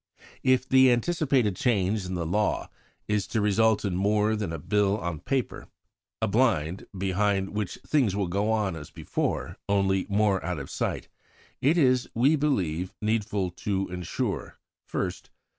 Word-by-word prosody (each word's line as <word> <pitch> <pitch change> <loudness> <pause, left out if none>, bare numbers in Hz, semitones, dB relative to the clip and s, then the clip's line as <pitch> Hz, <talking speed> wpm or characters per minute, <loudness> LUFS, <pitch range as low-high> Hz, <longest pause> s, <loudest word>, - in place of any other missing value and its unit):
If 130 0 +2
the 130 -1 +6
anticipated 130 - +1
change 100 -3 +1
in 90 - -3
the 85 -2 -2
law 105 +6 0 0.4
is 105 -2 0
to 110 - -1
result 105 +1 +3
in 95 -3 -1
more 105 +3 +2
than 105 -5 -3
a 80 - -3
Bill 100 +5 +1
on 85 -6 -4
paper 135 - -2 0.6
a - - +3
blind, 100 - +1
behind 95 +1 0
which 105 -3 -3
things 125 -10 +2
will 100 -1 0
go 100 +5 0
on 105 -5 0
as 75 -2 -8
before - - -3
only 95 -1 +2
more 100 -1 +2
out 90 0 -2
of 70 -2 -7
sight - - -2 0.5
it 150 +6 +3
is, 130 -5 +3
we 135 +7 +4
believe, 95 - -1
needful 105 -4 -1
to 95 -2 -1
ensure: 90 -1 -3 0.3
1st. - - -3
105 Hz, 155 wpm, -27 LUFS, 95-115 Hz, 0.6 s, the